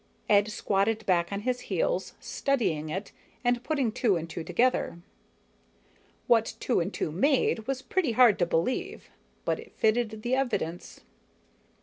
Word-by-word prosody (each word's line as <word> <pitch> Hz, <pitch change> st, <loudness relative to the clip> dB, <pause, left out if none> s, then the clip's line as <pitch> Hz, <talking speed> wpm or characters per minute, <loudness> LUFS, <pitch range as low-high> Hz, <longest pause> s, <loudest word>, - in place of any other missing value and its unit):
Ed 205 Hz, 0 st, +4 dB
squatted 215 Hz, +1 st, 0 dB
back 175 Hz, -1 st, +2 dB
on 200 Hz, 0 st, -3 dB
his 250 Hz, +2 st, -1 dB
heels, -, -, -1 dB
studying 175 Hz, -, -1 dB
it 190 Hz, +6 st, -4 dB, 0.3 s
and 245 Hz, 0 st, +1 dB
putting 275 Hz, -7 st, 0 dB
two 215 Hz, -2 st, +2 dB
and 165 Hz, -1 st, -3 dB
two 165 Hz, 0 st, -6 dB
together. 230 Hz, +2 st, +1 dB, 1.3 s
What 230 Hz, -3 st, +3 dB
two 245 Hz, -, +1 dB
and 170 Hz, -, -1 dB
two -, -, -3 dB
made 225 Hz, -, +1 dB
was 265 Hz, -1 st, -2 dB
pretty 345 Hz, -11 st, 0 dB
hard 235 Hz, -3 st, +6 dB
to 175 Hz, -, +2 dB
believe, 255 Hz, -, -2 dB, 0.3 s
but -, -, 0 dB
it -, -, -12 dB
fitted 220 Hz, -1 st, 0 dB
the 245 Hz, +1 st, -1 dB
evidence. 240 Hz, -10 st, -2 dB
220 Hz, 145 wpm, -28 LUFS, 185-255 Hz, 1.3 s, hard